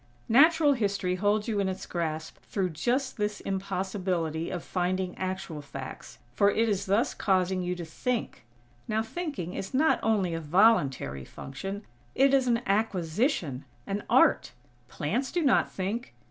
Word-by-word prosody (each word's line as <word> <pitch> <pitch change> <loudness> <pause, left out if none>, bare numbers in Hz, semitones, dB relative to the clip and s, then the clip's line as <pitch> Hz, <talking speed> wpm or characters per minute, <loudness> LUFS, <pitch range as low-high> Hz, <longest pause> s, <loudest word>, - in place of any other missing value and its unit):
Natural 300 +4 +6
History 200 -6 0
holds 205 +3 +1
you 215 -3 0
in 195 -1 +1
its 190 - -5
grasp 160 -2 -3
through 190 -3 -2
just 250 - -1
this 210 -1 -1
impossibility 185 -4 -2
of 175 -2 -4
finding 185 0 -1
actual 185 -4 -4
facts; 135 -2 -9 0.2
for 200 +10 +4
it 225 +2 +2
is 200 -3 -1
thus 205 +5 +2
causing 185 -1 +1
you 180 0 -2
to 175 -1 -6
think. 240 - -3 0.4
Now, 220 +1 0
thinking 250 - -4
is 195 +6 -5
not 315 +4 +4
only 205 -6 +1
a 165 - -3
voluntary 150 - +3
function; 195 - -7 0.3
it 275 +1 +4
is 265 -2 +4
an 235 0 +2
acquisition; 185 - 0 0.2
an 200 +1 -3
art. - - +4 0.3
Plants 265 +2 -2
do 350 -2 0
not 270 - +3
think. 200 - -4
195 Hz, 150 wpm, -28 LUFS, 175-225 Hz, 0.4 s, Natural